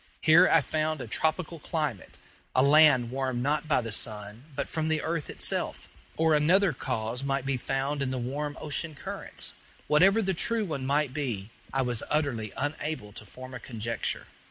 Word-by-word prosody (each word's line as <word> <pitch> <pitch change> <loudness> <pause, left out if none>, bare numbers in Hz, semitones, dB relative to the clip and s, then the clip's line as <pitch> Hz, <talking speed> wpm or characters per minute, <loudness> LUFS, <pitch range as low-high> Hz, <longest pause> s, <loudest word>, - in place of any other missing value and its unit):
Here 160 +2 +7
I - - +5
found 155 0 -1
a - - -5
tropical 160 +7 -1
climate 150 - -3 0.4
a 130 - +5
land 140 -4 +6
warmed 130 -2 -1
not 150 +3 0
by 145 -4 +3
the 115 -1 -5
sun, 105 +2 -2
but 145 - -2
from 160 -1 -2
the 155 -1 +1
earth 165 -2 -2
itself. - - +1 0.3
Or 160 0 +3
another 165 +4 +4
cause 125 -1 -3
might 135 -1 -1
be 135 0 0
found 135 +3 -2
in 135 - 0
the 130 - -2
warm 145 +4 -3
ocean 155 +1 -2
currents. - - -5 0.3
Whatever 195 +9 +5
the 190 0 +1
true 225 +5 +1
one 140 -7 -3
might 140 -1 +1
be, 115 -8 -3 0.2
I 135 0 +1
was 120 -3 -2
utterly 130 -9 0
unable 145 -6 -3
to 110 - -9
form 130 +5 -10
a 130 - -6
conjecture. 115 -2 -3
140 Hz, 180 wpm, -28 LUFS, 125-155 Hz, 0.4 s, Here